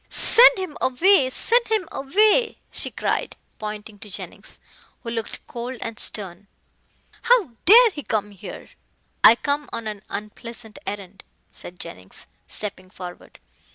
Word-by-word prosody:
"Send 480 -2 +6
him 370 -5 -5
away 275 +2 +4
send 470 - +3
him 430 -6 0
away!" 425 - +2
she - - -1
cried, - - -2 0.2
pointing 210 -1 -7
to 210 - -12
Jennings, 195 - -9 0.5
who 230 - -5
looked 225 -2 -5
cold 245 +2 -6
and 225 -1 -6
stern. 200 -1 -2 0.7
"How 480 - +3
dare 460 +4 +9
he 300 - -7
come 210 -5 -2
here." 195 - -10 0.5
"I 230 - +9
come 285 +3 -2
on 230 - -5
an 210 -2 -5
unpleasant 220 +1 -8
errand," 200 -1 -7 0.3
said 175 0 -9
Jennings, 95 +1 -10 0.2
stepping 190 -3 -6
forward. 180 -1 -11
230 Hz, 135 wpm, -23 LUFS, -, 0.7 s, dare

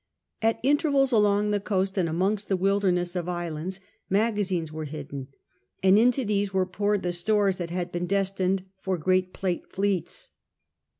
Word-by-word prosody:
At 225 0 +2
intervals 280 -1 +3
along 210 -2 +3
the 205 - +1
coast 195 -1 -1
and 180 -4 +1
amongst 195 +5 0
the 190 - +2
wilderness 185 -2 +1
of 180 -1 -2
islands 175 +1 -4 0.3
magazines 195 -6 +1
were 155 0 -5
hidden, 140 -3 -7 0.6
and 190 +2 +6
into 245 +2 +3
these 205 -1 0
were 190 -1 +1
poured 205 +2 0
the 175 - 0
stores 195 +2 +2
that 175 -2 -4
had 175 0 -3
been 175 0 -2
destined 195 -1 0
for 190 -1 -1
great 185 +2 +1
Plate 185 -3 -3
fleets. 200 - -2
190 Hz, 160 wpm, -26 LUFS, 175-205 Hz, 0.6 s, and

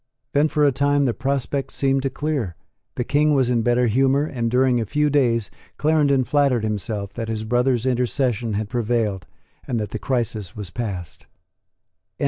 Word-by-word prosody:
Then 145 +2 +4
for 150 -1 +1
a 145 - +5
time 140 +1 +2
the 120 - +1
prospect 135 +1 -2
seemed 135 -1 +1
to 135 - -1
clear; 140 - -2 0.4
the 125 - -1
King 150 +3 +2
was 130 -2 +2
in 120 -2 +2
better 120 +2 +2
humour; 135 +5 +2
and 120 -6 -2
during 125 0 +3
a - - -2
few 150 +5 +1
days 115 -7 +1 0.3
Clarendon 145 -3 +3
flattered 140 -4 +2
himself 105 -1 -3
that 115 0 -4
his 110 -1 -3
brother's 120 +1 +1
intercession 125 -2 0
had 105 +1 -2
prevailed, 110 -5 -1 0.4
and 120 -3 -1
that 105 -2 -4
the 110 - -4
crisis 115 -7 -2
was 100 -4 -7
passed. 95 -7 -6
125 Hz, 170 wpm, -22 LUFS, 110-140 Hz, 0.4 s, a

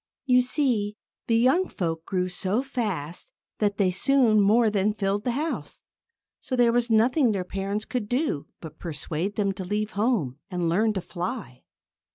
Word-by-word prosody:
You 250 -2 +5
see, 245 -6 0 0.3
the 230 - +3
young 265 +11 +3
folk 165 -2 -3
grew 180 -1 0
so 190 +6 -1
fast 205 - -4 0.3
that 205 -2 +1
they 190 -3 +3
soon 235 0 +3
more 220 +4 +4
than 205 +1 +1
filled 200 0 -1
the 245 - +1
house. 315 +3 -4 0.6
So 255 - -3
there 240 -2 +4
was 240 0 +1
nothing 235 +3 +3
their 190 -2 -1
parents 195 +3 -3
could 240 -5 -3
do 250 - -1
but 160 -2 -10
persuade 165 +4 -3
them 200 -2 +1
to 190 0 -6
leave 210 +3 -2
home 200 - 0
and 175 -2 -1
learn 215 +6 +2
to 190 - -2
fly. 175 - -6
210 Hz, 170 wpm, -26 LUFS, 185-240 Hz, 0.6 s, You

